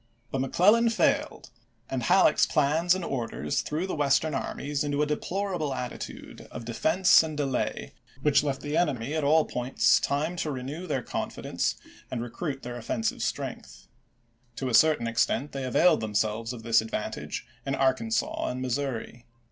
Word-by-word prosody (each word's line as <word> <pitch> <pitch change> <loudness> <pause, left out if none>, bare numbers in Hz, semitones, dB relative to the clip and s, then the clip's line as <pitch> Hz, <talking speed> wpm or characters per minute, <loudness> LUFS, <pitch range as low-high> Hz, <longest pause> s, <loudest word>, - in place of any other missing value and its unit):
But 135 - -1
McClellau 210 - +4
failed, 225 - 0 0.4
and - - -3
Halleck's - - +4
plans 160 +5 +2
and 185 -2 -4
orders 115 - -2
threw 160 +5 -2
the 190 - -4
Western 145 +1 +2
armies 140 +2 -2
into 145 0 0
a - - +2
deplorable 170 -1 -2
attitude 125 -1 -7
of 115 - -8
de 120 - -5
fense 165 +11 +5
and 155 -2 -5
delay, 135 -3 -2 0.3
which 150 -2 +4
left 140 -2 -2
the 145 +1 -3
enemy 140 -6 0
at 155 -1 -1
all 155 +2 +4
points 115 -2 +2
time 150 +5 -1
to 160 - -2
renew 145 +6 -5
their 135 -6 -1
confidence - - -2 0.3
and 120 -2 -3
recruit 135 +3 -5
their 120 0 -5
1862. - - -6 0.4
offensive - - -6
strength. - - -5 0.7
To 130 +1 -3
a - - -3
certain 155 -1 +5
extent 115 +5 0
they 135 -1 -4
availed 160 +6 +4
themselves 110 +1 -1
of 120 -3 -8
this 115 -1 +4
advantage 110 - -4 0.2
in 135 - -1
Arkansas 130 -4 0
and 125 - -4
Missouri. 125 -2 -3
140 Hz, 165 wpm, -27 LUFS, 120-155 Hz, 0.7 s, fense